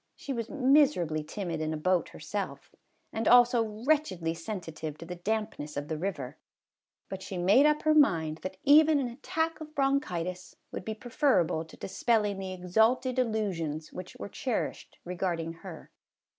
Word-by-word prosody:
She 275 - -5
was 230 -2 -4
miserably 255 - +3
timid 170 -1 -4
in 155 0 -1
a - - -3
boat 180 +3 +1
herself, - - -6 0.4
and 220 0 -1
also 245 -1 +6 0.2
wretchedly 190 - +1
sensitive 165 -4 -6
to 165 - -9
the 180 - -6
dampness 175 -7 -3
of 145 +1 -4
the 160 - -2
river, 160 -9 -4 0.7
but 190 -1 -6
she 190 - -6
made 200 +12 +5
up 300 0 +1
her 310 - +4
mind 165 - +3
that 185 0 -6
even 305 +2 +6
an 270 -3 0
attack 320 +6 -2
of 310 0 -9
bronchitis 185 - -1 0.2
would - - -6
be 220 - -3
preferable 235 - +1
to 160 - -15
dispelling 210 0 0
the 190 -1 -4
exalted 220 +8 +2
illusions 185 -10 -2
which 185 0 -8
were - - -6
cherished 240 +2 -3
regarding 175 -2 -2
her. 180 -4 -10
195 Hz, 155 wpm, -29 LUFS, 165-255 Hz, 0.7 s, also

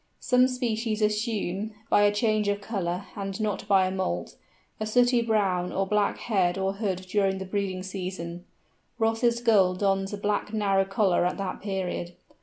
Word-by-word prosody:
Some 250 0 +4
species 230 -3 -2
assume 210 -1 -1
(by - - +4
a 205 0 +5
change 215 0 +1
of 205 0 0
colour 195 -3 -3
and 195 -1 -4
not 215 -2 -2
by 195 -2 +4
a 185 - -1
moult) 185 - -3 0.4
a 215 - -2
sooty 245 +2 +4
brown 195 -6 +1
or 195 - 0
black 210 +1 +1
head 190 -5 +1
or 195 0 0
hood 195 -3 -3
during 195 0 +1
the 190 - -5
breeding 190 -1 -2
season; 180 -2 -6 0.5
Ross's 230 +1 +2
Gull 200 -6 +4
dons 195 0 0
a 205 - -4
black 205 +1 -1
narrow 195 -3 +2
collar 195 -2 +2
at 180 - 0
that 195 -2 -4
period. 185 -3 -3
200 Hz, 170 wpm, -27 LUFS, 190-215 Hz, 0.5 s, a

